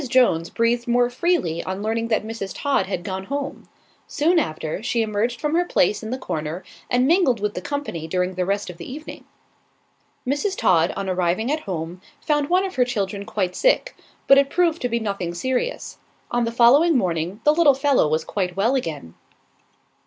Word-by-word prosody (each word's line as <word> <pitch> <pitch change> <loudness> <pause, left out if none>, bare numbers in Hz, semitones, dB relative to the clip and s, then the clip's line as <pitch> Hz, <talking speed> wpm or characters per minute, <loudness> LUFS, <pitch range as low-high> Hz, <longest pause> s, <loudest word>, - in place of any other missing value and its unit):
Jones, 200 -11 +3
breathed 235 +1 0
more 245 0 +2
freely 245 - 0
on 190 +2 -4
learning 225 +1 -1
that 220 -2 0
Mrs. 220 -3 -5
Todd 285 -7 +1
had 180 -3 -3
gone 190 +1 -4
home. 280 +4 -5 0.4
Soon 335 +4 +2
after, 155 - -3
she 235 0 0
emerged 220 +3 -1
from 300 0 -1
her 345 +2 +3
place 210 - +1
in 220 - -6
the 255 - -2
corner, 160 -6 -4 0.3
and 250 +1 +2
mingled 305 - +3
with 210 0 -2
the 180 - -5
company 275 - -4
during 180 +2 -1
the 185 0 -1
rest 200 0 -2
of 175 - -15
the 170 - -8
evening. 305 +4 -9 1.0
Mrs. 290 +10 -1
Todd, 170 -1 +3
on 195 0 -4
arriving 185 +6 0
at 310 - 0
home, 170 +1 -4 0.2
found 295 -2 0
one 365 +2 +3
of 375 -6 -6
her 250 - +5
children 200 -5 -3
quite 200 -4 -2
sick; - - +2 0.3
but 275 0 +7
it 275 0 +2
proved 335 0 +1
to 245 - -1
be 235 0 0
nothing 200 -5 -3
serious. 260 - -2 0.3
On 240 -1 +1
the 230 - -2
following 270 +7 +5
morning, 180 -1 -1
the 300 - +5
little 305 -4 +5
fellow 275 - +3
was 155 +1 0
quite 180 -1 -3
well 225 +6 +2
again. 155 - -3
230 Hz, 190 wpm, -22 LUFS, 185-280 Hz, 1.0 s, but